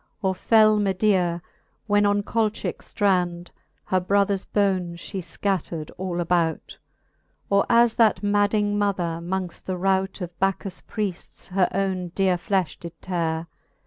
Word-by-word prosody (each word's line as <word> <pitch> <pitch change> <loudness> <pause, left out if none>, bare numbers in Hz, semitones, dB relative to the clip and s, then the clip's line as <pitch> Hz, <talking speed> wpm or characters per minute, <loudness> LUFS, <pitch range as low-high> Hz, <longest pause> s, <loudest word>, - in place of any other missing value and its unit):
Or 190 -1 +2
fell 215 +2 +4
Medea, 190 -3 +1 0.4
when 205 -1 +3
on 205 0 +1
Colchicke 220 0 -1
ftrand 180 -4 0 0.4
Her 185 - +1
brothers 200 +1 +1
bones 185 -4 0
fhe 195 +2 -6
fcattered 175 -4 -3
all 180 -1 -3
about 170 -1 -1 0.7
5 - - -30
Or 200 0 +4
as 235 -1 +5
that 220 -2 +3
madding 205 0 +2
mother, 180 -5 0
mongft 180 0 -4
the 185 -1 -3
rout 190 +1 0
Of 175 -2 -7
Bacchus 195 0 -1
Priefts 200 -5 -5
her 185 -1 +2
owne 190 -2 -1
deare 190 -2 +2
flefh 185 -2 -1
did 170 -1 -10
teare. 165 -3 -1
190 Hz, 140 wpm, -24 LUFS, 175-205 Hz, 0.7 s, as